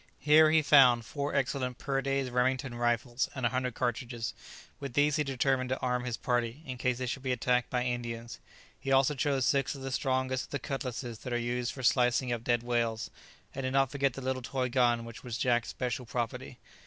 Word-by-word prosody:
Here 155 +1 +6
he 160 0 +4
found 125 -6 +6
four 140 +3 -3
excellent 130 -2 -1
Purday's 135 -1 -1
Remington 125 +1 0
rifles 120 +1 0
and 130 -3 -2
a - - +4
hundred 125 -1 -2
cartridges; 120 -1 -2 0.5
with 140 -3 -6
these 145 0 +3
he 150 - +2
determined 135 -1 0
to 130 - 0
arm 125 -1 -1
his 120 -2 -3
party, 120 +3 -1
in 130 -3 -6
case 125 -1 +1
they 130 - -3
should 130 +2 -3
be 130 -1 -2
attacked 125 0 +1
by 125 -1 0
Indians. 120 -1 -4 0.4
He 135 - -3
also 135 +2 +4
chose 135 -2 0
six 140 0 +1
of 135 - -9
the 135 - -4
strongest 130 -1 0
of - - -22
the 140 - -2
cutlasses 125 -5 -5
that 125 - -5
are - - +2
used 120 0 -1
for 130 - -8
slicing 125 0 +3
up 115 -1 -4
dead 120 -1 +1
whales; 115 -2 -1 0.4
and 135 - -4
did 130 0 -2
not 135 -2 +3
forget 140 -2 +1
the 135 - -7
little 130 0 -2
toy 125 0 -2
gun 120 -2 +2
which 115 -1 -10
was 120 -2 -4
Jack's 120 -2 +1
special 125 -1 -3
property. 120 -1 -4
125 Hz, 210 wpm, -30 LUFS, 120-135 Hz, 0.5 s, Here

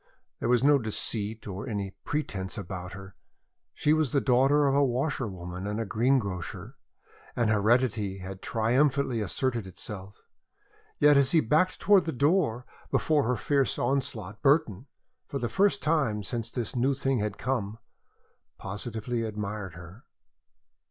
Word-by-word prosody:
There - - -1
was 125 0 +3
no 145 0 +5
deceit 110 -1 -1
nor 100 +4 -6
any 100 -3 -3
pretence 100 -11 -3
about 90 -2 -6
her. 95 0 -10 0.6
She 150 - +2
was 155 -5 +1
the 140 - +4
daughter 135 +3 +3
of 135 - +2
a 140 +1 +4
washerwoman 105 - -2
and 105 +2 -2
a 115 - -1
greengrocer, 110 -5 -1 0.6
and 115 -2 +2
heredity 110 -2 +2
had 95 0 -8
triumphantly 125 +2 +1
asserted 115 +1 -2
itself. 95 +1 -8 0.7
Yet 145 -1 +6
as 140 +1 +3
he 165 - +6
backed 155 +8 +2
towards 195 -4 +4
the 160 - -1
door 140 -3 +1 0.2
before 150 -4 +2
her 125 +2 +1
fierce 140 +1 +1
onslaught, 120 -7 -2
Burton, 135 - +2 0.4
for 140 - -4
the 120 - -2
first 200 +1 +2
time 135 -10 +1
since 115 +3 -3
this 120 -1 -3
new 130 +3 +2
thing 135 -2 0
had 105 -1 -2
come, 115 -4 -2 0.8
positively 110 +4 -4
admired 105 -4 -4
her. 90 +6 -12
115 Hz, 145 wpm, -28 LUFS, 100-140 Hz, 0.8 s, Yet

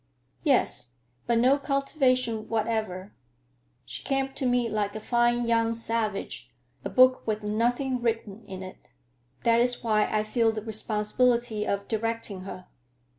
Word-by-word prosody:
"Yes; 120 +1 +2 0.3
but 235 -1 +2
no 260 +4 +4
cultivation 260 -5 0
whatever. 215 -4 -2 0.7
She 125 - -6
came 270 0 -1
to 265 -1 -1
me 245 -1 +2
like 210 -2 -2
a - - -3
fine 240 +1 +1
young 230 0 +2
savage, 225 -3 -2 0.3
a - - -3
book 255 -1 +4
with 215 -1 -1
nothing 240 +4 0
written 225 -2 -2
in 190 -1 -7
it. 185 - -12 0.5
That 230 0 +4
is 245 0 +1
why 215 -2 +3
I 215 0 0
feel 225 +1 +2
the 215 -1 -5
responsibility 220 +1 +1
of 200 0 -2
directing 225 -4 -3
her." 185 -2 -8
230 Hz, 140 wpm, -27 LUFS, 210-245 Hz, 0.7 s, no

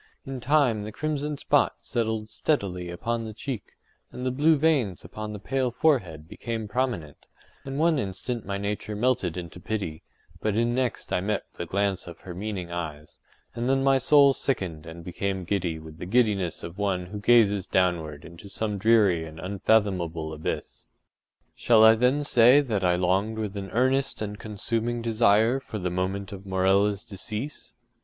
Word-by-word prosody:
In 135 -1 -5
time 125 -4 +2
the 105 +1 -6
crimson 150 +2 -2
spot - - +2
settled 110 -2 -2
steadily 90 - -1
upon 115 +7 -2
the 110 -1 -7
cheek, 120 -2 -6 0.4
and 125 - -6
the 130 - +1
blue 150 +4 +4
veins 140 - +1
upon 105 0 -6
the 105 - -5
pale 130 +5 -1
forehead 100 - 0
became 115 +3 -5
prominent; 105 - -3 0.4
and 135 0 -4
one 160 -1 +3
instant 110 +3 -4
my 100 +1 -3
nature 105 +1 -3
melted 105 -7 0
into 90 0 -7
pity, 90 -5 -4 0.4
but 110 -2 0
in, 120 +1 +2
next 125 -2 -2
I - - +2
met 105 +1 -1
the 85 - -6
glance 100 0 -1
of 85 -1 -10
her 90 - -8
meaning 95 -2 -5
eyes, 75 -3 -6 0.3
and 120 +2 -2
then 135 0 +2
my 135 0 +4
soul 140 +1 +6
sickened 90 - -3
and 85 +1 -9
became 95 +2 -3
giddy 90 -3 -1
with 80 0 -11
the 90 - -6
giddiness 100 -6 +1
of 85 +4 -8
one 95 -3 0
who 105 +3 -7
gazes 105 -3 +4
downward 85 -5 0
into 85 +4 -12
some 105 0 -3
dreary 105 -6 +4
and 80 0 -9
unfathomable 90 -4 0
abyss. 75 - -5 0.7
Shall 115 -2 +4
I 110 0 +9
then 125 +6 +2
say 125 0 +6
that 110 -8 -2
I 90 -1 +3
longed 95 +5 +1
with 105 -2 -3
an 100 -1 -5
earnest 130 +3 +1
and 105 -1 -5
consuming 115 +2 -2
desire 115 +2 +3
for 125 -5 -7
the 90 -3 -2
moment 95 +2 -2
of 100 -1 -8
Morella’s 95 +2 +2
decease? 110 +8 -6
105 Hz, 170 wpm, -26 LUFS, 90-120 Hz, 0.7 s, I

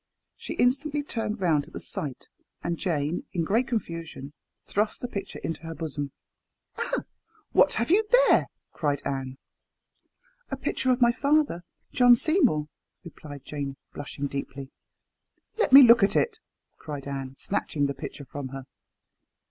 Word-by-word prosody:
She - - -6
instantly 285 +4 +1
turned 225 -6 -3
round 155 -5 +2
at - - -17
the - - -5
sight, 140 -5 -6 0.4
and 170 - -1
Jane, 160 -2 -1
in 170 - 0
great 225 +9 +1
confusion, 165 - -4 0.3
thrust 210 +2 -1
the 245 - -4
picture 200 -4 -6
into 165 - -3
her 165 0 -7
bosom. 145 -3 -4 0.7
"Ah - - -1
I - - -18 0.5
what - - +5
have 235 +7 0
you 415 +4 +5
there?" - - +5 0.3
cried 145 -2 -1
Anne. 135 -1 -3 1.1
"A - - -3
picture 260 - -1
of 250 0 +2
my 240 0 +6
father, 280 - +1 0.3
Sir - - -22
John 245 -1 +8
Seymour," 230 - +2 0.4
replied 145 -5 -10
Jane, 140 -2 -5 0.2
blushing 145 0 -5
deeply. 140 -1 -5 0.9
"Let - - +2
me 275 +1 +11
look 235 -1 +8
at 200 - +3
it," 445 -2 +1 0.4
cried 145 -3 -7
Anne, 135 -1 -5
snatching 155 -7 -1
the 140 - -1
picture 140 +1 -8
from 140 +1 -6
her. 135 +1 -7
165 Hz, 155 wpm, -27 LUFS, -, 1.1 s, me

